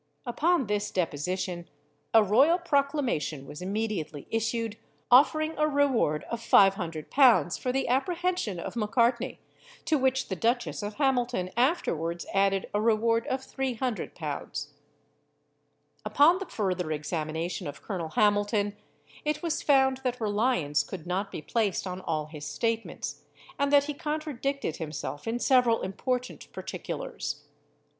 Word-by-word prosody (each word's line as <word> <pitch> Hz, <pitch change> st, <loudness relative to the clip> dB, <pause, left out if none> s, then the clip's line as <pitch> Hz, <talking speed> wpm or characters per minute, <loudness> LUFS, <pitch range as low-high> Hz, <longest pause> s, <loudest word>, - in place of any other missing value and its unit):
Upon 305 Hz, +4 st, +2 dB
this 205 Hz, 0 st, -1 dB
deposition, 175 Hz, +1 st, -2 dB, 0.4 s
a 225 Hz, -1 st, +7 dB
royal 265 Hz, -, +5 dB
proclamation 280 Hz, -, 0 dB
was 145 Hz, +4 st, -9 dB
immediately 190 Hz, -7 st, -3 dB
issued, 225 Hz, 0 st, -1 dB, 0.3 s
offering 310 Hz, +5 st, +5 dB
a 305 Hz, -, +4 dB
reward 270 Hz, -, +2 dB
of 235 Hz, -1 st, -3 dB
500l. 195 Hz, -, +4 dB
for 250 Hz, -, -1 dB
the 270 Hz, +1 st, 0 dB
apprehension 340 Hz, -, 0 dB
of -, -, -6 dB
Macartney, 235 Hz, +3 st, +1 dB, 0.4 s
to 310 Hz, -3 st, +2 dB
which 265 Hz, 0 st, +1 dB
the 190 Hz, -, -1 dB
Duchess 235 Hz, +6 st, 0 dB
of 205 Hz, 0 st, -5 dB
Hamilton 245 Hz, -9 st, 0 dB
afterwards 175 Hz, -, 0 dB
added 195 Hz, 0 st, +2 dB
a 205 Hz, -, +1 dB
reward 230 Hz, +1 st, +2 dB
of 260 Hz, 0 st, -1 dB
300l. 255 Hz, -3 st, -4 dB, 1.3 s
Upon 330 Hz, +6 st, +5 dB
the 390 Hz, -, -5 dB
further 185 Hz, -6 st, -2 dB
examination 155 Hz, +2 st, -3 dB
of 145 Hz, -, -8 dB
Colonel 175 Hz, -6 st, -4 dB
Hamilton, 205 Hz, +2 st, +2 dB, 0.5 s
it 300 Hz, +1 st, -1 dB
was 335 Hz, -2 st, -1 dB
found 265 Hz, -2 st, +4 dB
that 255 Hz, -2 st, -3 dB
reliance 205 Hz, -, +1 dB
could 160 Hz, +2 st, -8 dB
not 190 Hz, +3 st, -2 dB
be 155 Hz, -, -6 dB
placed 215 Hz, -6 st, 0 dB
on 185 Hz, 0 st, -5 dB
all 155 Hz, -4 st, -2 dB
his 150 Hz, -1 st, -8 dB
statements, 225 Hz, +8 st, -3 dB, 0.4 s
and 280 Hz, 0 st, +2 dB
that 285 Hz, -1 st, +6 dB
he 295 Hz, +1 st, -4 dB
contradicted 285 Hz, -, -3 dB
himself 150 Hz, +1 st, -5 dB
in 230 Hz, +1 st, 0 dB
several 245 Hz, -2 st, +3 dB
important 250 Hz, +6 st, -3 dB
particulars. -, -, -5 dB
225 Hz, 130 wpm, -28 LUFS, 185-265 Hz, 1.3 s, a